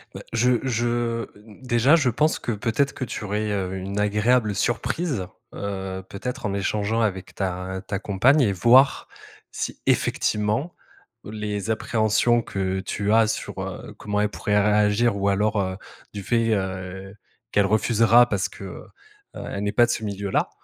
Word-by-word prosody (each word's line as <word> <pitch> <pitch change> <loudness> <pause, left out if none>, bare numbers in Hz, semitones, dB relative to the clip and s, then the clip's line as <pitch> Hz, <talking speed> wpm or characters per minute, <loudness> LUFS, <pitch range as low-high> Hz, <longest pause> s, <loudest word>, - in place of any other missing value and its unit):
Bah, - - -7
je 120 +1 +2
je, 120 -1 -1 0.4
déjà, 130 +5 +4
je 145 -6 +1
pense 150 +7 +1
que, 120 - -3
peut-être, 120 +6 0
que - - -5
tu 105 - -5
aurais, 105 +1 -2
heu, 95 -2 -2
une 95 +2 -4
agréable 105 +1 +2
surprise, 120 - -1 0.3
heu, 95 -2 -5
peut-être 120 +5 -5
en 100 - -1
échangeant 105 +3 -1
avec 95 -4 -2
ta 95 0 -3
ta 100 - -3
compagne 115 +9 +3
et 105 -7 +3
voir 125 +8 +4 0.4
si, - - -4
effectivement, 110 +10 0 0.5
les 105 -1 -4
appréhensions 110 +1 +2
que 95 -2 -2
tu 100 +2 -2
as 110 0 +5
sur, 110 - -4
heu, - - -7
comment 105 0 -2
elle 105 - +1
pourrait 105 0 -1
réagir, 105 +1 +2
ou 100 0 0
alors, 105 +1 +1
heu, 95 -1 -2 0.4
du 100 - -6
fait, 115 +1 +1
heu, 95 0 -4 0.4
qu'elle 100 -1 +3
refusera 115 +3 +4
parce 100 -2 0
qu'elle 95 -2 -10 0.7
n'est 105 - -1
pas 120 - +5
de 120 - -2
ce 110 - -3
milieu-là, 100 -1 -1
105 Hz, 155 wpm, -24 LUFS, 100-120 Hz, 0.7 s, as